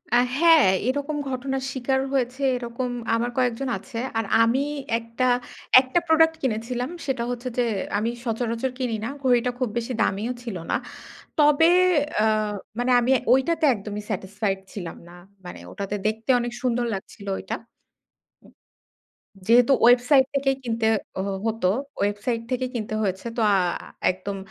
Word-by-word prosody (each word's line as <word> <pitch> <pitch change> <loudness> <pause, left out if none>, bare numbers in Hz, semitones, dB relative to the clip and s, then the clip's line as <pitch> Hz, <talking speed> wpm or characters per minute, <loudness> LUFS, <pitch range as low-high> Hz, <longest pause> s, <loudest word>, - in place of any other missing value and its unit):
আ - - +7 0.2
হ্যাঁ, 325 -1 +6 0.2
এরকম 285 +3 -1
ঘটনার 265 +1 -3
শিকার 265 +1 0
হয়েছে 255 0 -1 0.2
এরকম 245 +1 -4 0.3
আমার 235 +1 0
কয়েকজন 255 +1 0
আছে। - - -10 0.2
আর 225 - 0 0.2
আমি 235 +4 +2 0.4
একটা 230 +2 -3 0.6
একটা 260 +6 0
প্রোডাক্ট 320 0 +4
কিনেছিলাম। 245 +1 -2 0.2
সেটা 265 -4 -1
হচ্ছে 245 +1 -4
যে, 245 - +3 0.3
আমি 220 +3 0 0.2
সচরাচর 230 +2 -1
কিনি 245 -4 -1
না, - - -3
ঘড়িটা 250 -1 +3
খুব 255 - 0
বেশি 235 +2 -2
দামিও 215 +5 0
ছিল 230 -5 -5 0.2
না। - - +2 0.6
তবে 300 +2 +5 0.5
অ্যা 215 - +3 0.5
মানে 245 +1 0
আমি 240 +2 0 0.2
ওইটাতে 315 +5 +2
একদমই 210 0 -6
satisfied 195 0 -2
ছিলাম 175 -5 -6
না। 175 - -14 0.3
মানে 180 - -8
ওটাতে 200 +1 -4
দেখতে 220 +3 -2
অনেক 240 0 -3
সুন্দর 245 -1 +1
লাগছিল 200 +1 -9
ওইটা। - - -4
উম - - -23 1.8
যেহেতু 240 +3 +5
ওয়েবসাইট 245 +3 +6
থেকেই 270 -1 +1
কিনতে 230 -1 -1 0.4
হ - - -4 0.2
হতো, 225 -4 0 0.3
ওয়েবসাইট 205 +4 -1
থেকেই 255 0 -1
কিনতে 215 -2 -3
হয়েছে। 190 +1 -2
তো - - -1
আ - - +4 0.6
একদম 190 +2 -6
240 Hz, 145 wpm, -24 LUFS, 220-260 Hz, 1.8 s, আ